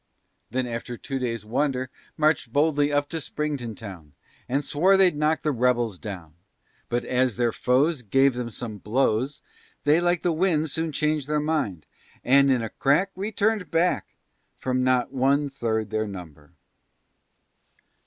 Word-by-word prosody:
Then 130 +2 -1
after 120 0 -5
two 135 +2 -4
days' 115 -4 -3
wonder, 130 +2 -1 0.3
March'd 155 -6 +2
boldly 145 +1 +2
up 145 0 +1
to 165 -1 -3
Springfield 140 -8 -4
town, 90 -9 -10 0.4
And 140 +2 0
swore 185 +8 +3
they'd 185 -4 +4
knock 155 +2 +1
the 150 - +1
rebels 120 -6 +1
down. 90 -7 -7 0.6
But 120 0 -1
as 125 -3 +1
their 120 -1 +2
foes 135 +6 +1
Gave 135 +5 +3
them 120 -1 -4
some 110 -2 -7
blows, 130 +5 0 0.4
They, 150 +4 +4
like 175 0 +1
the 175 - +2
wind, 160 -3 +1
Soon 160 0 -1
changed 150 -1 0
their 150 0 +1
mind. 150 - -1 0.4
And, 140 +2 +5
in 125 -3 +2
a 110 - -3
crack, 150 +8 +2
Returned 205 -1 -1
back, 165 +4 0 0.4
From 130 0 -1
not 130 0 +1
one 140 +2 +2
third 110 -5 -2
their 110 0 -1
number. 80 -7 -10
135 Hz, 155 wpm, -25 LUFS, 115-150 Hz, 0.6 s, And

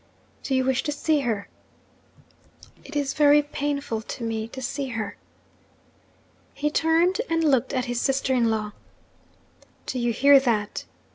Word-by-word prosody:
'Do 270 - -1
you 260 - +2
wish 265 0 +1
to 295 - -3
see 295 +1 +1
her?' 225 -7 -2 1.4
'It 295 - -11
is 280 -2 0
very 295 0 +5
painful 285 -5 -3
to 235 +2 -7
me 225 -1 -2
to 260 - -9
see 270 +2 -3
her.' 220 -4 -4 1.4
He 295 +1 -1
turned 335 +7 +2
and 330 0 +1
looked 265 -5 +2
at 255 -2 -1
his 245 -1 -2
sister 270 -1 +1
in 235 -3 +2
law. 215 -1 -2 1.1
'Do 255 - -3
you 240 0 +1
hear 275 +4 +6
that?' 220 -6 -1
265 Hz, 150 wpm, -25 LUFS, 235-290 Hz, 1.4 s, hear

